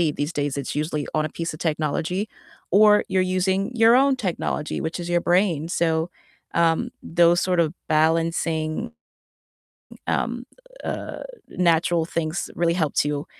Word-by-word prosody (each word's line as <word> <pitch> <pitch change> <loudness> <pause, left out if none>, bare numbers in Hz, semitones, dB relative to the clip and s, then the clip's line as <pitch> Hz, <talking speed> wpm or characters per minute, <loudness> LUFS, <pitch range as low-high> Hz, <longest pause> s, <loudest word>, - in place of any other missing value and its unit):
these 145 +2 -2
days, 145 -3 -2
it's 140 0 -4
usually 150 -1 -2
on 155 0 +1
a - - -3
piece 165 +2 -4
of 155 - -10
technology, 160 +5 -1 0.4
or 210 +2 +6
you're 190 - +1
using 190 +3 0
your 230 +1 +6
own 270 +1 +4
technology, 180 -8 -2
which 160 +2 -3
is 175 0 -5
your 175 0 +2
brain, 175 -4 +2
so, 165 -1 0 0.4
um, 165 -1 +2
those 170 +1 +3
sort 180 -2 +1
of 160 -2 +2
balancing, 160 +4 0 1.2
um, - - -1 0.4
uh, - - -5 0.3
natural 170 -1 +2
things 165 +1 -3
really 170 0 +1
helps 155 -6 +1
you 145 0 -2
170 Hz, 145 wpm, -23 LUFS, 155-185 Hz, 1.2 s, or